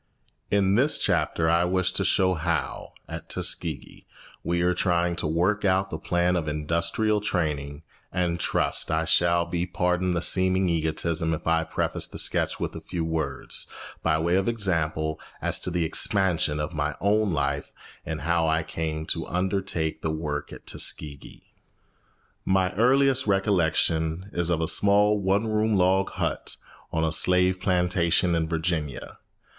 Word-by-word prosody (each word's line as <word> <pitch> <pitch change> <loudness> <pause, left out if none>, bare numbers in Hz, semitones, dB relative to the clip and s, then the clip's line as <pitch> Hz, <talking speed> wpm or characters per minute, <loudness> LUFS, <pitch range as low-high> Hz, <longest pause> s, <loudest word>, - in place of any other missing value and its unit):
In 100 -1 +2
this 135 +8 +3
chapter 80 - 0
I 85 +1 +3
wish 95 0 +1
to 95 - -1
show 95 0 +2
how, 85 0 -3
at - - -8
Tuskegee, 80 -5 -3 0.4
we 85 0 0
are 90 +1 +2
trying 85 -1 +1
to - - -1
work 90 +7 +1
out 95 0 +1
the - - -4
plan 90 +1 +1
of 80 -3 -2
industrial 85 +8 0
training, 75 -6 -2 0.3
and 85 -1 -1
trust - - +1
I 80 +1 0
shall 85 +1 +2
be 85 +1 -2
pardoned 90 0 0
the 85 - -1
seeming 95 0 +2
egotism 80 0 0
if - - -10
I 80 0 +2
preface 80 - -1
the - - -9
sketch - - +1
with - - -4
a - - -7
few 85 -3 -4
words, 80 -4 -2 0.3
by 80 -1 +2
way 85 +3 +1
of 95 - 0
example, 80 -8 0 0.2
as - - +1
to - - -4
the 85 -1 0
expansion 80 -3 +1
of 75 +4 -3
my 75 -1 -2
own 105 0 +2
life 70 -2 -2 0.3
and 80 0 -5
how 85 +1 +1
I 80 +1 +1
came 80 -1 -4
to - - -6
undertake 90 -3 -1
the 80 - -2
work 75 -2 -4
at - - -11
Tuskegee. 70 -3 -3 0.9
My 95 -1 +1
earliest 130 +3 +3
recollection 90 -2 +1
is 85 -1 -1
of 85 -2 +1
a 80 - 0
small 105 +2 +4
one 100 +2 +1
room 110 0 +1
log 95 +1 +2
hut - - -2 0.4
on 80 0 0
a 80 - +1
slave 90 +3 +3
plantation 90 -1 +2
in 80 -1 0
Virginia. 80 -4 -3
85 Hz, 160 wpm, -25 LUFS, 80-95 Hz, 0.9 s, small